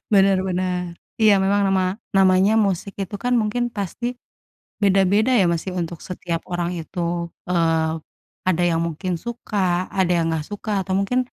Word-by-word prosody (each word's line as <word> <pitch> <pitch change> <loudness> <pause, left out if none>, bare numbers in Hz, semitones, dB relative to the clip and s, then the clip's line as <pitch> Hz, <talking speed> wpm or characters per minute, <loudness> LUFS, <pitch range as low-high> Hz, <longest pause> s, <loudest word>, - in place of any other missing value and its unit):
Bener 195 -1 +5
bener. 180 0 -1 0.4
Iya, 215 -1 +6
memang 200 +1 +2
nama 190 -1 +2 0.3
namanya 190 +1 +5
musik 195 +1 -2
itu, 195 +1 -6
kan, 245 - +1
mungkin 215 +3 -1
pasti 200 +4 -3 0.8
beda-beda, 200 +4 +3
ya, - - +4
Mas, 170 -1 -1 0.2
untuk 170 0 -4
setiap 175 -2 -3
orang 175 0 -1
itu. 170 +3 -6 0.5
Eee, 165 -2 +2 0.6
ada 175 -1 +2
yang 165 0 +1
mungkin 170 +3 -3
suka, 235 -3 -4 0.4
ada 185 -2 +3
yang 165 - +1
gak 155 -2 -2
suka 205 +1 -5
atau 190 - -4
mungkin 200 +6 0
190 Hz, 155 wpm, -22 LUFS, 175-200 Hz, 0.8 s, Iya